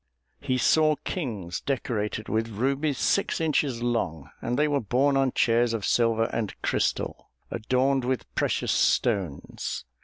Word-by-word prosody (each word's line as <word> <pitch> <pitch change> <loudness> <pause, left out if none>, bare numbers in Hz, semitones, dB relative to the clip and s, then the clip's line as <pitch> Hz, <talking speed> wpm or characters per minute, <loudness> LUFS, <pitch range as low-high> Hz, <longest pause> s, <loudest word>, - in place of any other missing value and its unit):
He 130 -3 -1
saw 155 +4 +4
kings 105 - -4
decorated 110 -5 -2
with 110 +1 0
rubies 135 +6 0
six 200 - +1
inches 145 -6 0
long; 85 - -2
and 120 +1 -1
they 150 +1 +3
were 145 -1 +1
borne 130 +6 +2
on 135 -1 +2
chairs 115 0 +2
of 105 - -3
silver 115 -1 +2
and 110 -3 -3
crystal, - - -1 0.2
adorned 130 +3 +1
with 130 -1 -1
precious - - 0
stones. 95 - 0
120 Hz, 140 wpm, -26 LUFS, 110-140 Hz, 0.2 s, saw